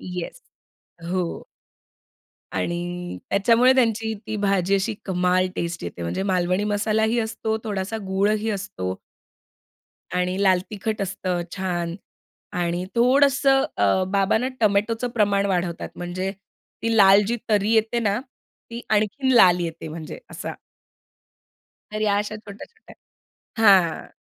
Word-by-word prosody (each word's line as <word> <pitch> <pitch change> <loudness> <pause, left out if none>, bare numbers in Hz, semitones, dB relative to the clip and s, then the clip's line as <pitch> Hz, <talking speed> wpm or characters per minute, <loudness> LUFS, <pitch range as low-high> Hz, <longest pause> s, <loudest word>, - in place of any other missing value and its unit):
Yes. 180 - -6 0.7
हो. 180 -2 -2 1.1
आणि 175 +1 -3
त्याच्यामुळे 230 +6 +4
त्यांची 225 -3 +1
ती 215 0 -3
भाजी 195 -2 +1
अशी 200 +3 0
कमाल 180 -1 +1
टेस्ट 170 - -3
येते. 85 0 -6
म्हणजे 85 - -2
मालवणी 185 0 +1
मसालाही 220 +2 +1
असतो, 220 0 -2
थोडासा 205 0 -3
गूळही 210 +3 +1
असतो. 95 - -4 1.2
आणि 180 +2 0
लाल 185 -2 +4
तिखट 215 +1 -3
असतं 185 -2 -2 0.2
छान 175 -3 -2 0.6
आणि 175 +1 -1
थोडंसं 270 +2 +4
अ, 100 - +2
बाबांना 200 +5 +2
टोमॅटोचं 220 +3 +1
प्रमाण 200 -3 +2
वाढवतात 175 -3 -2
म्हणजे 180 +2 -3 0.5
ती 230 0 +1
लाल 200 -1 +7
जी 235 - 0
तरी 210 0 +2
येते 225 +1 +2
ना 205 -2 +1 0.5
ती 235 0 -6
आणखीन 215 +5 +1
लाल 180 -7 +6
येते 165 -1 -4
म्हणजे 155 0 -7
असा. - - -6 1.4
तर 215 - -3
या 205 -1 +2
अशा 210 +1 -3
छोट्या-छोट्या 215 - -13 0.7
हां. 185 -5 +4
200 Hz, 120 wpm, -23 LUFS, 180-220 Hz, 1.4 s, लाल